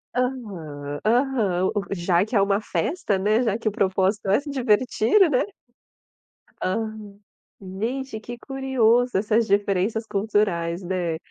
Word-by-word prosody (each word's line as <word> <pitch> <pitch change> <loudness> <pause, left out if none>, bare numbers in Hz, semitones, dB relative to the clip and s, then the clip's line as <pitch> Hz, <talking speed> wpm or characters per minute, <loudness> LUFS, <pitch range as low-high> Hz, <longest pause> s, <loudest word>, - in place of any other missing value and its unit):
Aham. 175 - -4
Aham. 230 -6 +2
O 205 - +2
o - - -10
já 175 0 +2
que 220 +2 -5
é 200 - +5
uma 200 +1 +2
festa, 205 - -1
né, 215 +5 +2
já 220 -2 0
que 225 - -5
o - - +2
propósito 195 -1 0
é 200 - +4
se 285 +1 -9
divertir, 255 - +3
né? 255 - +2 1.2
Aham. 210 0 -3 0.4
Gente, 220 +6 -4
que 240 +2 -8
curioso 250 -4 +1
essas 215 +3 +1
diferenças 200 +2 +1
culturais, 195 -5 0
né. 175 -3 -2
210 Hz, 140 wpm, -24 LUFS, 190-240 Hz, 1.2 s, é